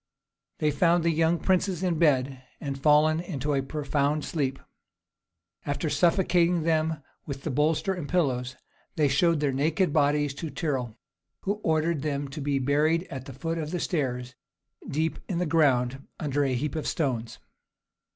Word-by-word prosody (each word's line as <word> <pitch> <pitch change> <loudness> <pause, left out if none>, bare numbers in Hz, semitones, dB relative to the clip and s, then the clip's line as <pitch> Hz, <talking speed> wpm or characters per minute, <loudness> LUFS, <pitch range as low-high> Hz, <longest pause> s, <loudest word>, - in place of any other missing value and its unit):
They 150 -1 +1
found 170 +3 +3
the 170 - +3
young 165 +1 +2
princes 185 0 0
in 175 -4 0
bed, 135 -4 +2 0.2
and 140 -2 -4
fallen 155 +2 +4
into 150 -5 -3
a 135 - +1
profound 145 +1 -1
sleep. 135 -4 -1 1.1
After 145 +2 -2
suffocating 175 +1 +3
them 160 -2 0 0.2
with 140 -2 -6
the - - -2
bolster 155 +7 +1
and 170 -6 -6
pillows, 130 -8 0 0.4
they 150 -3 +3
showed 155 +3 +2
their 145 -2 +2
naked 155 +5 +1
bodies 145 -1 +2
to 165 - -3
Tyrrel, 130 -9 -3 0.4
who 205 +2 -2
ordered 160 -1 +1
them 145 -1 -2
to 150 +2 -6
be 140 0 0
buried 150 +5 +2
at 130 -2 -6
the 135 - -8
foot 165 +5 -3
of 155 -1 -3
the 180 +2 -2
stairs, 125 -7 -2 0.6
deep 160 +3 -1
in 180 - -1
the 180 - 0
ground, 135 -5 +2
under 145 -2 0
a 135 -2 +1
heap 140 +3 -2
of 155 - -3
stones. 120 -7 -2
150 Hz, 160 wpm, -27 LUFS, 140-165 Hz, 1.1 s, fallen